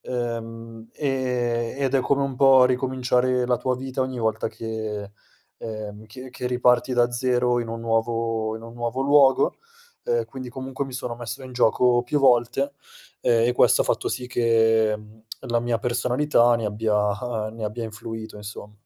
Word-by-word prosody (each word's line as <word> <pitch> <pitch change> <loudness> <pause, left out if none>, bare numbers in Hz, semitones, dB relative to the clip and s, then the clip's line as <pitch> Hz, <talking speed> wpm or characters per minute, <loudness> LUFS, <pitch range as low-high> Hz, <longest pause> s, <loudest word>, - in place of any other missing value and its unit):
uhm, 115 -2 -5
e 125 -4 -1
ed 135 -1 0
è 135 - +4
come 140 +2 +1
un 135 -1 -2
po' 135 -1 +7
ricominciare 125 0 +1
la 125 -1 +1
tua 130 -1 -1
vita 130 0 -5
ogni 130 -1 -2
volta 110 -1 -1
che 110 -3 -5 0.5
ehm 110 -1 -7
che 130 +4 -10
che 125 - -5
riparti 125 0 +2
da 120 0 +3
0 125 0 +1
in 115 - -5
un 115 0 -5
nuovo 115 -1 -1
in 110 - -11
un 115 - -10
nuovo 120 +2 -3
luogo, 140 -1 +4 0.5
ehm, 475 -1 0
quindi 130 -1 -8
comunque 130 +2 -5
mi 130 - -9
sono 125 -1 -4
messo 120 +2 -7
in 130 - -9
gioco 120 0 +3
più 145 +4 0
volte, 135 +1 +3 0.5
ehm, 115 -1 +3
e - - +2
questo - - +4
ha - - -6
fatto - - 0
sì 125 -1 -4
che 115 -3 +3 0.4
la 120 0 -1
mia 120 -1 -1
personalità 120 +1 +2
ne 115 - -4
abbia 105 +1 -1
ne 115 0 -10
abbia 110 +2 -4
influito 110 0 -7
insomm 105 0 -9
120 Hz, 170 wpm, -24 LUFS, 115-130 Hz, 0.5 s, po